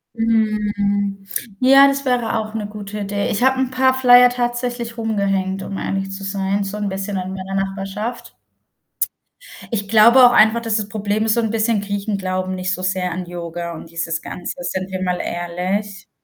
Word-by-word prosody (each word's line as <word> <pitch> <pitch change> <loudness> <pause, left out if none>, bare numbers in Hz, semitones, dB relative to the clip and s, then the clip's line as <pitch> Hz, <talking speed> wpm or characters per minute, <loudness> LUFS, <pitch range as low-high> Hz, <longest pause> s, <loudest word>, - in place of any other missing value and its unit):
Mhm. 205 -3 0 0.4
Ja, 275 +2 +7
das 275 0 0
wäre 240 -3 0
auch 215 0 -4
'ne 210 -2 -3
gute 210 0 -7
Idee. 200 0 -2
Ich 220 +5 -1
habe 265 0 +3
'n 260 -1 0
paar 260 0 +3
Flyer 250 -1 +7
tatsächlich 240 -1 -3
rumgehängt, 195 -3 -1
um 195 - -5
ehrlich 195 0 -3
zu 195 0 -7
sein, 195 +1 -1
so 195 +2 -5
'n 205 -1 -2
bisschen 195 +1 -4
in 185 +1 -4
meiner 190 0 -5
Nachbarschaft. 195 +5 -4 1.4
Ich 205 -2 -1
glaube 235 +4 +7
auch 245 - +6
einfach, 220 +1 +5
dass 225 -2 -1
das 210 -2 -2
Problem 210 0 -1
ist, 220 0 +2
so - - +2
'n 225 -2 0
bisschen 225 -1 +1
Griechen 200 0 -3
glauben 185 0 -2
nicht 185 0 -2
so 185 - -4
sehr 185 -1 -1
an 180 0 -4
Yoga 170 -1 -6
und 160 0 -10
dieses 165 -1 -3
Ganze, 180 - -6
sind 185 +2 -3
wir 185 0 -3
mal 180 -1 -1
ehrlich. 185 +4 -3
205 Hz, 185 wpm, -20 LUFS, 190-225 Hz, 1.4 s, Ja